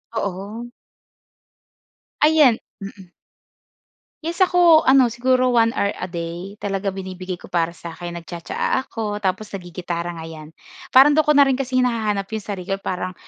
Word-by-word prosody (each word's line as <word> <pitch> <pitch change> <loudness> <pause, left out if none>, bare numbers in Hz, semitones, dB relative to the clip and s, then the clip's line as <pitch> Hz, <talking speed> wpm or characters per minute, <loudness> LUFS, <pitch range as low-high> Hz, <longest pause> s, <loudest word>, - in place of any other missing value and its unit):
Oo. 205 +3 -4 1.5
Ayan. 300 -6 +5 0.2
Mm. 195 -2 -10 1.1
Yes 340 +3 -3
ako, 350 -3 +6
ano 260 -5 +4
siguro 255 +1 +2
1 230 -1 +4
hour 200 - +1
a 180 - -6
day, 170 +3 -6
talaga 195 -1 -2
binibigay 185 -1 -6
ko - - -15
para 165 -1 +2
sa'kin 170 +1 -8
nagtsa-tsa-a 170 +9 -3
ako 210 -5 -5
tapos 200 +2 -2
naggi-gitara 175 -2 -5
nga 165 -2 -7
'yan. 155 -1 -10 0.4
Parang 270 +3 +7
do'n 310 - +5
ko 300 -1 +2
na 280 - +7
rin 270 - +2
kasi 260 -1 -2
hinahanap 220 -5 0
yung 220 - -2
sarili 195 -1 -5
ko, 195 - -4
parang 185 0 -4
200 Hz, 150 wpm, -21 LUFS, 180-255 Hz, 1.5 s, Parang